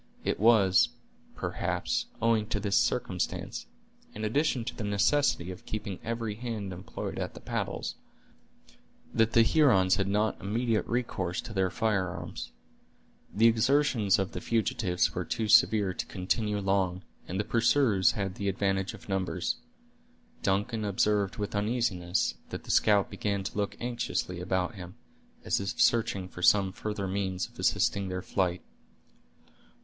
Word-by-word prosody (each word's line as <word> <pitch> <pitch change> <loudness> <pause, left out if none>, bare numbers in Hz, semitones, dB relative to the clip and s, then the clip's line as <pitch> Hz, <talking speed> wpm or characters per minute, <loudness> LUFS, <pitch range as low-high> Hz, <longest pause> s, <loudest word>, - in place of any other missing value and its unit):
It - - -1
was, 110 -1 +5 0.5
perhaps, 240 0 -2 0.2
owing 115 -2 +3
to 105 - -1
this 100 -1 0
circumstance, 95 -4 -1 0.5
in 110 +1 -3
addition 130 +1 +1
to 120 - -5
the 110 - -5
necessity 100 -2 +2
of 90 - -11
keeping 100 -3 -4
every 115 -1 -3
hand 110 -4 -5
employed 90 +1 -6
at - - -4
the - - -8
paddles, - - -3 1.2
that 115 0 +2
the 115 - +7
Hurons 115 -9 +4
had 100 -1 0
not 105 +1 0
immediate 110 +2 0
recourse 110 -6 -2
to 120 - -9
their 95 -2 +1
firearms. 100 -3 -2 0.8
The 110 +3 +3
exertions 115 -2 +3
of 95 -1 -1
the - - -6
fugitives 110 -5 0
were - - -2
too 110 - -2
severe 105 -2 +5
to - - -4
continue 105 +3 -1
long, 95 -2 0 0.2
and 95 +2 -3
the - - +1
pursuers 115 -3 +3
had 100 -5 -3
the 100 +1 -2
advantage 95 0 -1
of - - -15
numbers. 95 -2 -1 0.8
Duncan 105 +2 0
observed 100 0 +1
with 105 -1 -3
uneasiness, 105 -5 0 0.2
that - - -6
the - - -4
scout 105 -2 +3
began 100 -2 -2
to - - -5
look 100 -1 -2
anxiously 120 -7 -2
about 90 0 -1
him, 90 -3 -9 0.5
as - - +1
if 100 -2 -4
searching 100 -5 +2
for 90 - -10
some 95 +1 +5
further 105 -1 -4
means 95 -1 -2
of - - -21
assisting 100 -1 +1
their 90 0 -4
flight. 90 -3 -1
100 Hz, 145 wpm, -29 LUFS, 95-115 Hz, 1.2 s, the